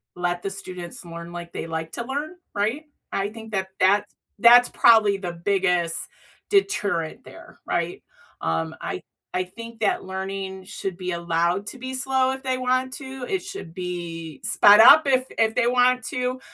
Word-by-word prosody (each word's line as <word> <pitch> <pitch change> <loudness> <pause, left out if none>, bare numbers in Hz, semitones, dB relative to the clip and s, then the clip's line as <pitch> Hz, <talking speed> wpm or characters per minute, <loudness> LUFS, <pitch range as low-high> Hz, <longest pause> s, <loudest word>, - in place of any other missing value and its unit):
let 175 0 -2
the 195 - -3
students 180 -2 -8
learn 170 0 -8
like 170 0 -8
they - - -5
like 160 0 -4
to 235 - -3
learn, 290 +6 -4 0.2
right? 220 +10 -1 0.3
I 195 +1 -1
think 220 0 -11
that 190 -2 -2
that's 205 +2 +3 0.3
that's 240 +1 +8
probably 220 -4 +5
the 180 -3 -5
biggest 175 -2 +1 0.5
deterrent 205 - 0
there, - - -14
right? - - -2 0.4
Um, 80 0 -1
I - - -4 0.3
I 185 - 0
think 230 +5 -11
that 205 - +1
learning 190 0 -5
should 190 -1 -6
be 185 0 -4
allowed 170 +3 0
to 260 - -6
be 260 +1 -6
slow 260 0 +1
if 265 - -5
they 260 -1 -1
want 255 +1 0
to, 265 -3 -7
it 380 -2 -1
should 375 - -8
be 170 -4 -6
sped 205 +1 +6
up 290 +7 +9
if 255 -1 +3
if 220 -1 +2
they 240 -1 +2
want 250 +1 +3
to, 250 0 -2
200 Hz, 170 wpm, -24 LUFS, 175-255 Hz, 0.5 s, up